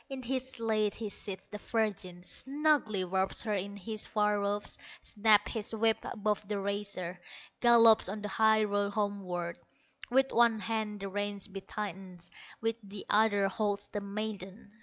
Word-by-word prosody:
In 265 -1 -6
his 260 +1 -2
sleigh 220 -2 +1
he 215 +1 -6
seats 195 -1 -5
the 210 - -7
virgin, 200 -6 -2
Snugly 275 -5 +1
wraps 190 +1 0
her 215 -2 -1
in 200 +1 -3
his 215 +2 -1
fur 210 -1 +1
robes, 205 +1 -2 0.2
Snaps 210 -1 +3
his 225 -1 -2
whip 225 0 +3
above 210 -2 -2
the 210 0 -2
racer, 195 -3 -3 0.4
Gallops 230 -4 +6
on 210 +1 -5
the - - -2
high 220 +1 +4
road 205 -1 0
homeward; 190 -5 -2 0.5
With 265 +2 +3
one 235 -1 +5
hand 215 -2 -3
the 195 - -3
reins 205 0 -3
he 195 - -5
tightens, 190 -4 -6 0.3
With 225 0 0
the 200 -1 -8
other 205 -2 +4
holds 205 +1 -2
the 205 - -4
maiden. 200 0 -6
210 Hz, 160 wpm, -31 LUFS, 200-220 Hz, 0.5 s, Gallops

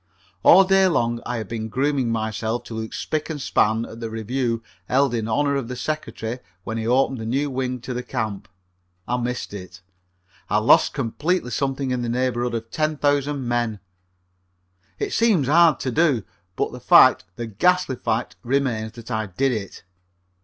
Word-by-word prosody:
All 190 - +8
day 195 0 +4
long 120 -8 0
I 125 - -2
have 110 -3 -5
been 110 0 -4
grooming 135 +1 0
myself 110 +1 -2
to - - -9
look 110 0 -4
spic 155 +1 -3
and 155 -2 -4
span 110 -3 +1
at 115 - -10
the 115 -1 -4
review 115 +1 -2 0.2
held 135 0 +2
in 110 -2 -1
honor 140 +5 +1
of 135 -4 -2
the 125 - -5
Secretary 125 -4 -4 0.2
when 115 +3 -4
he 110 - -3
opened 130 +1 +2
the 110 - -5
new 140 +4 0
wing 130 -1 -2
to 125 - -5
the 125 - -3
camp. 110 -6 -4 0.6
I 125 - 0
missed 125 -2 -3
it. 90 -2 -9 0.7
I - - +2
lost - - +4
completely 145 +4 -1
something 135 +2 -1
in 125 -1 -1
the 120 - -2
neighborhood 120 0 0
of 115 0 -5
ten 155 -1 -1
thousand 145 -2 0
men. 120 -3 -1 1.2
It - - -3
seems 210 - +3
hard 165 0 +5
to 130 - -1
do, 145 -7 +2 0.3
but - - -1
the - - -8
fact, - - +6
the 120 - -4
ghastly 135 - +1
fact, 115 0 -2
remains 120 -4 -1
that 115 0 -10
I 110 -2 -1
did 135 +9 0
it. 105 -5 -5
125 Hz, 180 wpm, -23 LUFS, 115-140 Hz, 1.2 s, All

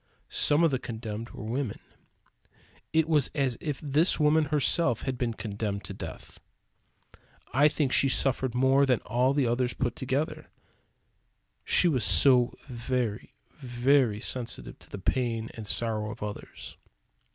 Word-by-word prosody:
Some 150 +3 +2
of 165 - +4
the 130 - 0
condemned 115 -1 -6
were - - -9
women. 120 +1 -3 1.1
It 160 0 +2
was 150 -5 +3
as 135 -4 +1
if 145 -4 -3
this 150 +5 +2
woman 155 +1 +4
herself 145 -3 +2
had 130 -1 -2
been 120 -2 -2
condemned 105 -2 -4
to - - -8
death. - - -9 1.1
I 145 +4 +5
think 145 -3 0
she 135 - +4
suffered 130 -2 0
more 135 +2 +4
than 125 -3 +2
all 125 +3 +1
the 140 -3 +2
others 120 +1 0
put 120 -3 -2
together; 135 +5 -3 1.1
she 180 - +3
was 130 -9 +1
so 120 +8 +5 0.2
very, 120 -3 -3 0.2
very 125 -3 +2
sensitive 125 +2 -5
to - - -18
the - - -7
pain 115 +2 -1
and 110 -2 -8
sorrow 110 -1 -2
of 105 - -7
others. 105 -1 -8
125 Hz, 145 wpm, -28 LUFS, 115-140 Hz, 1.1 s, I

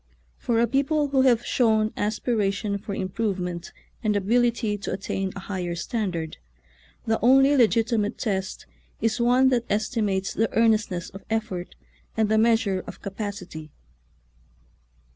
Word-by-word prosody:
For 230 -1 0
a 235 - +4
people 280 +4 +1
who 270 -1 +3
have 240 -3 +3
shown 220 -3 +2
aspiration 210 -1 -1
for 200 0 -5
improvement 185 -3 -3 0.3
and 210 -2 +1
ability 230 +1 +1
to 195 - -4
attain 195 0 -3
a 200 - -6
higher 180 -3 -4
standard, 175 -4 -3 0.7
the 225 0 +1
only 270 +3 +6
legiti 230 -3 +3
mate 210 +2 -2
test 190 -4 -3 0.3
is 225 +2 0
one 250 +2 +4
that 240 -2 +1
estimates 205 -2 0
the 225 0 0
earnest 225 -1 +3
ness 175 -2 -5
of 195 - -11
effort 215 -5 -3 0.4
and 220 -1 +2
the 220 0 +3
measure 220 -4 +2
of - - -10
capacity. 195 -6 -6
215 Hz, 140 wpm, -25 LUFS, 195-235 Hz, 0.7 s, only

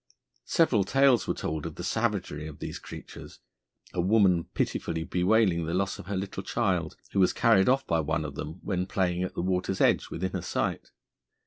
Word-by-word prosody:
Several 130 - +3
tales 135 +3 +3
were - - 0
told 80 0 -3
of 80 - -8
the - - -7
savagery 95 -8 -1
of 75 -2 -9
these - - -6
creatures, - - -10 0.6
a 90 - 0
woman 95 -3 +3
pitifully 80 - -1
bewailing 90 -2 +2
the 85 - -1
loss 95 +1 -1
of - - -10
her 100 -1 -2
little 95 0 -4
child, 95 -6 -1
who 100 - 0
was 95 - +4
carried 115 -3 +4
off 135 +1 +2
by 85 - +1
one 80 +1 -1
of 75 - -5
them 80 +6 -6
when 90 -1 -1
playing 90 -2 0
at 95 - -3
the - - -2
water's 95 +1 -1
edge - - +3
within 95 +2 -3
her - - -3
sight. - - -2
95 Hz, 195 wpm, -28 LUFS, 85-100 Hz, 0.6 s, was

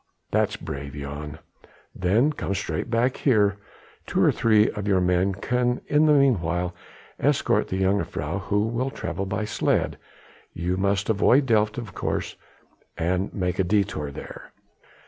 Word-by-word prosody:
"That's - - +1
brave, 70 -4 -6
Jan. 75 +2 -6 0.6
Then 110 +11 +2
come 100 -8 -3
straight 105 +4 -3
back 120 +2 +1
here; 105 -7 +3 0.5
two - - -1
or - - +5
three 110 -2 +4
of 105 -1 -5
your 95 -2 +3
men 90 +1 +1
can 125 +4 0
in 150 +1 +4
the 150 - +6
meanwhile 90 - +2 0.5
escort - - +2
the 95 +1 -2
jongejuffrouw, 95 -2 -1
who 105 +1 +1
will 120 +4 -1
travel 100 -6 -4
by 105 +2 -2
sledge. 105 - 0 0.6
You 90 +2 -1
must 100 +1 0
avoid 120 +6 +4
Delft 110 -3 +2
of 110 -7 -6
course, - - -3 0.6
and 90 +4 0
make 90 -2 -2
a - - +4
détour 90 -7 0
there." - - -10
100 Hz, 145 wpm, -25 LUFS, 90-115 Hz, 0.6 s, the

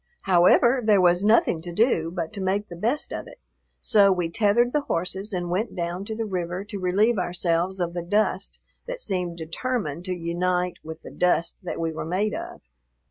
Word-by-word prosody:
However, 195 +8 +5
there 210 -2 +4
was 175 +1 +4
nothing 210 -6 +3
to 175 +1 -7
do 170 -4 +2
but 170 +2 -4
to 200 - -5
make 195 +2 -1
the 175 - -8
best 235 - -1
of - - -5
it, - - -14 0.4
so 200 -2 +5
we 175 -3 -1
tethered 230 +5 +2
the 300 - +2
horses 190 -1 -2
and 175 -2 -3
went 210 +6 -1
down 175 +2 -3
to 220 - -4
the 225 0 -2
river 180 -2 -3
to 205 -1 -6
relieve 200 +5 +2
ourselves 175 +1 0
of 170 -1 -1
the 175 - -3
dust 205 +5 0 0.3
that - - -4
seemed 180 - -2
determined 170 - -3
to 185 -1 -2
unite 180 +1 -1
with 160 +1 -9
the - - -9
dust 175 -2 +1
that - - -4
we 165 -1 -1
were 160 - -5
made 190 +6 -1
of. - - -7
180 Hz, 195 wpm, -25 LUFS, 175-210 Hz, 0.4 s, However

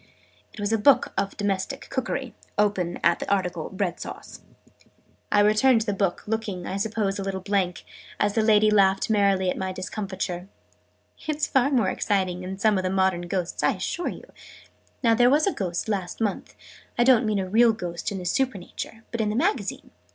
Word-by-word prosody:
It - - -13
was 205 +2 -1
a 225 - +2
book 280 +6 +4
of 195 0 -2
Domestic 205 +6 -2
Cookery, 260 -1 -3 0.2
open 200 -4 +1
at 170 0 +3
the - - -4
article 180 -5 -1
Bread 190 -2 -2
Sauce.' - - -9 0.9
I 205 - +5
returned 220 +4 +4
the 210 -2 -1
book, 195 -2 -1
looking, 210 -5 -3
I 190 - -3
suppose, 205 -1 -1
a - - -2
little 195 -1 -3
blank, 190 -2 -1 0.4
as 205 0 +2
the 225 - +2
lady 215 -1 +4
laughed 195 0 +3
merrily 195 -3 +3
at - - -5
my 190 0 -2
discomfiture. 185 -1 -4 0.8
"It's 305 0 0
far 265 -1 +2
more 240 -9 +2
exciting 185 -3 -1
than 190 +1 -6
some 205 -1 +3
of - - -3
the 185 - 0
modern 190 -2 +1
ghosts, 180 -1 -2
I - - +3
assure 350 - -3
you! - - -8 0.8
Now 230 -1 +5
there 245 +2 +5
was 295 +3 +4
a 395 - +1
Ghost 175 -1 -3
last 195 -4 -3
month 215 -3 -2 0.4
I 240 - +4
don't 250 -1 +5
mean 215 -1 +1
a 190 -1 -1
real 230 +4 +5
Ghost 175 -5 -4
in 200 - -4
in 180 - -6
Supernature 225 0 -3
but 235 - -1
in 210 -1 0
a - - -3
Magazine. 345 - -1
200 Hz, 190 wpm, -25 LUFS, 185-225 Hz, 0.9 s, I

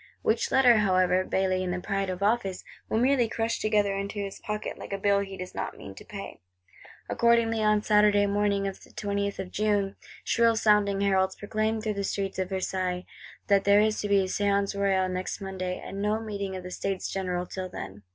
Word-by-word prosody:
Which 225 +1 +1
Letter, 250 -3 +6
however, 185 -2 +3
Bailly 185 0 0
in 185 - -2
the 180 0 -2
pride 195 0 -2
of 185 +1 -3
office, 200 -3 0 0.3
will - - +1
merely 245 -1 +3
crush 225 +1 -1
together 210 -2 +1
into 200 +2 -4
his 200 -1 -5
pocket, 210 0 -4
like - - -8
a 195 - -1
bill 200 0 +2
he 195 -1 -5
does 185 0 -7
not - - -4
mean 100 - -9
to - - -12
pay. - - -8 0.7
Accordingly 235 -1 +2
on 210 -1 +3
Saturday 210 -1 +4
morning 200 0 +1
the 195 - -1
20th 200 +1 -4
of 190 -1 -6
June, 205 -2 0 0.3
shrill 230 -1 +3
sounding 210 -2 +3
heralds 190 -1 +2
proclaim 215 +1 -1
through 215 -1 -1
the 200 0 -3
streets 195 -1 -2
of 185 -1 -1
Versailles, 185 -1 -2 0.4
that 200 -1 +3
there 200 0 +5
is 215 0 +1
to 205 - -2
be 200 -1 +4
a - - 0
Séance 200 +1 0
Royale 195 -2 +2
next 185 0 -3
Monday; 190 -2 -4
and 195 +1 -6
no 210 +1 +1
meeting 200 -3 -4
of 185 - -6
the 180 - -8
States 195 +1 -3
General 180 -2 -2
till 185 0 -6
then. 100 - -8
200 Hz, 200 wpm, -27 LUFS, 190-210 Hz, 0.7 s, Letter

